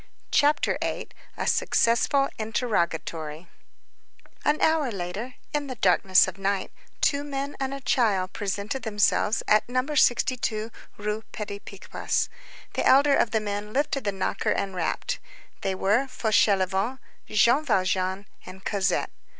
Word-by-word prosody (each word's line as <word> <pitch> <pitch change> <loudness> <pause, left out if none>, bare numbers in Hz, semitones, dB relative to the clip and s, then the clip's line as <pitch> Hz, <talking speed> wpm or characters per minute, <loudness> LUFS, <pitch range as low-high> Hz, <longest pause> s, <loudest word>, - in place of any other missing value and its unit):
CHAPTER 295 0 +3
VIII—A - - -5
SUCCESSFUL 275 +4 +2
INTERROGATORY 170 -8 -2 1.0
An 300 +1 +2
hour 315 -4 +3
later, 200 +6 -5 0.2
in 295 -1 -1
the 255 - -5
darkness 185 -2 +4
of 185 +1 -7
night, 195 0 -1 0.3
two 285 -1 +2
men 280 0 -4
and 270 -1 -2
a 275 0 -5
child 200 -8 +1
presented 205 +5 -3
themselves 210 0 +1
at 215 +2 +3
No. 255 +1 +1
62 235 -4 +1 0.3
Rue 210 +1 -2
Petit 205 -1 -5
Picpus. 200 -1 -3 0.4
The - - -1
elder 280 +1 +6
of - - +2
the 220 - +1
men 205 0 -4
lifted 280 0 0
the 200 - 0
knocker 195 -1 -2
and 195 -1 -1
rapped. 165 -3 -2 0.4
They 190 -1 -1
were 210 +8 +2
Fauchelevent, 205 -1 +1 0.3
Jean 235 +7 +4
Valjean, 185 - 0 0.2
and 190 +1 -12
Cosette. 195 -1 0
210 Hz, 130 wpm, -26 LUFS, 195-260 Hz, 1.0 s, elder